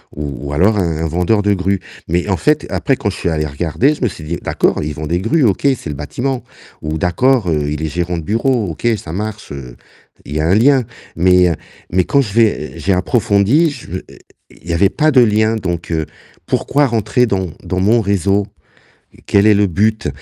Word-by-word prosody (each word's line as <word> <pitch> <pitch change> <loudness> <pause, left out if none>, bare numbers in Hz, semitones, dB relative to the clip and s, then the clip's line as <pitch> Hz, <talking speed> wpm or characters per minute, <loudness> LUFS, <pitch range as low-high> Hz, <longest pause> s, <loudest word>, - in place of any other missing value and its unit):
ou 70 -1 -5
ou - - -4
alors 100 +8 +3
un 85 -5 0
un - - 0
vendeur 90 +6 +1
de 100 0 +2
grues. 95 +1 0 0.3
Mais 90 +4 0
en 95 - +2
fait, 150 -1 +1
après 135 - 0
quand 105 - -1
je - - -5
suis 85 - -1
allé 75 -1 -1
regarder, 85 - 0
je - - -15
me 120 - +2
suis 80 -4 -10
dit: 85 +3 -3
«D'accord, - - 0
ils 75 0 -3
vendent 75 +1 -5
des 85 +1 +1
grues, 145 +7 +1
OK, 100 - +1
c'est 135 -11 +1
le 75 - -4
bâtiment, 120 - -3 0.4
ou 75 +1 -3
d'accord, 110 +3 +2
heu, 75 -2 0
il 75 +1 -3
est 80 - -1
gérant 85 +3 -2
de 80 - -5
bureau, 115 - 0
OK, 80 - -9
ça 80 -3 -8
marche, 105 0 -5
heu, 60 -3 -9 0.5
il 75 - -7
y 75 - +1
a - - 0
un 90 - +3
lien». 130 +3 +4 0.3
Mais 90 0 +4 0.4
mais 90 +1 +3
quand 140 - +2
j'ai 110 -1 +1
j'ai 95 - -1
approfondi, 115 - +2
je 130 - -10 0.2
i - - -14
i - - -17 0.4
il 85 - -11
y - - 0
avait 95 +3 +3
pas 155 - +5
de 130 -2 +6
lien, 110 0 +3
donc 85 -5 -4
heu, 80 -2 0 0.4
pourquoi 145 0 +1
rentrer 115 +2 +1
dans 95 -4 -1 0.2
dans 90 +1 -2
mon 110 +5 +3
réseau? 100 0 +1 0.8
Quel 100 +1 +3
est 105 - +6
le 100 0 +3
but? 105 0 0
95 Hz, 220 wpm, -16 LUFS, 85-115 Hz, 0.8 s, de